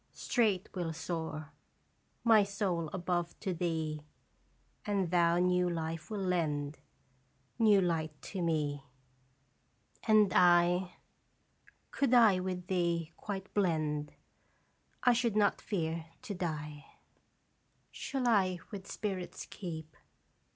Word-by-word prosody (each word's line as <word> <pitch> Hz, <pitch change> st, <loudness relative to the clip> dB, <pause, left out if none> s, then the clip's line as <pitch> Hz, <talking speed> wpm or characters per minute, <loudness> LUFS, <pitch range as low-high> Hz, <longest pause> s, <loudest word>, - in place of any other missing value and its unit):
straight 210 Hz, -7 st, +1 dB
will 175 Hz, -3 st, -2 dB
soar 160 Hz, -2 st, -4 dB, 0.7 s
My 225 Hz, -2 st, +7 dB
soul 195 Hz, -5 st, -1 dB
above 175 Hz, -1 st, -2 dB
to 190 Hz, -4 st, -1 dB
thee; 160 Hz, -3 st, -2 dB, 0.8 s
And 195 Hz, -4 st, 0 dB
thou 170 Hz, -1 st, +4 dB
new 180 Hz, 0 st, +2 dB
life 165 Hz, -1 st, -4 dB
will 210 Hz, -3 st, -3 dB
lend, 150 Hz, -5 st, -1 dB, 0.8 s
New 215 Hz, -3 st, +6 dB
light 160 Hz, -4 st, -1 dB
to 190 Hz, -, -5 dB
me. 150 Hz, -4 st, 0 dB, 1.2 s
And 215 Hz, -3 st, +5 dB
I 175 Hz, 0 st, +4 dB, 1.0 s
Could 265 Hz, -3 st, +2 dB
I 220 Hz, -6 st, +6 dB
with 180 Hz, -1 st, -3 dB
thee 170 Hz, -3 st, 0 dB
quite 195 Hz, -1 st, -6 dB
blend, 155 Hz, -6 st, 0 dB, 0.9 s
I 245 Hz, -, +6 dB
should 235 Hz, -2 st, +1 dB
not 205 Hz, -1 st, +3 dB
fear 165 Hz, -4 st, -2 dB, 0.2 s
to 205 Hz, -, -4 dB
die. 150 Hz, -5 st, -4 dB, 1.1 s
Shall 265 Hz, -3 st, -2 dB
I 190 Hz, -5 st, +3 dB
with 200 Hz, -2 st, -7 dB
spirits 190 Hz, -4 st, -4 dB
keep? 160 Hz, -4 st, -7 dB
180 Hz, 110 wpm, -32 LUFS, 160-200 Hz, 1.2 s, My